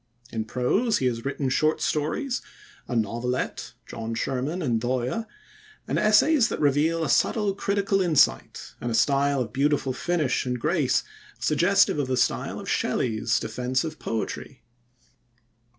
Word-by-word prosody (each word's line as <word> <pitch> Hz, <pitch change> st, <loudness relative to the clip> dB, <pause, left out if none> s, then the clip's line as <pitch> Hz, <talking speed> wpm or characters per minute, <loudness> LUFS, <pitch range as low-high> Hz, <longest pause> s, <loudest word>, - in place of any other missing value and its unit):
In 110 Hz, -1 st, -3 dB
prose 195 Hz, -, +1 dB
he 130 Hz, -, -1 dB
has 115 Hz, -2 st, -1 dB
written 140 Hz, 0 st, -2 dB
short 155 Hz, +4 st, +1 dB
stories, 240 Hz, -, -1 dB, 0.5 s
a 125 Hz, -, -3 dB
novelette, 120 Hz, +3 st, -2 dB
John 115 Hz, 0 st, -5 dB
Sherman 135 Hz, +9 st, -2 dB
and 115 Hz, -5 st, 0 dB
Dhoya, 130 Hz, -, -2 dB, 0.6 s
and -, -, 0 dB
essays 230 Hz, +5 st, +4 dB
that -, -, -4 dB
reveal 150 Hz, +3 st, +2 dB
a -, -, 0 dB
subtle 210 Hz, -3 st, +2 dB
critical 200 Hz, 0 st, 0 dB
insight, 155 Hz, -, +1 dB
and 120 Hz, -, -2 dB
a 115 Hz, -, -1 dB
style 140 Hz, +1 st, +2 dB
of 110 Hz, -3 st, -5 dB
beautiful 140 Hz, -1 st, +1 dB
finish 150 Hz, -3 st, 0 dB
and 125 Hz, -1 st, -3 dB
grace, -, -, +1 dB, 0.3 s
suggestive 170 Hz, +2 st, +3 dB
of 140 Hz, -, 0 dB
the 130 Hz, -1 st, 0 dB
style -, -, 0 dB
of -, -, -9 dB
Shelley's 115 Hz, 0 st, 0 dB
Defence 125 Hz, +1 st, -1 dB
of 155 Hz, -2 st, -6 dB
Poetry. 110 Hz, -1 st, -5 dB
140 Hz, 145 wpm, -25 LUFS, 125-170 Hz, 0.6 s, essays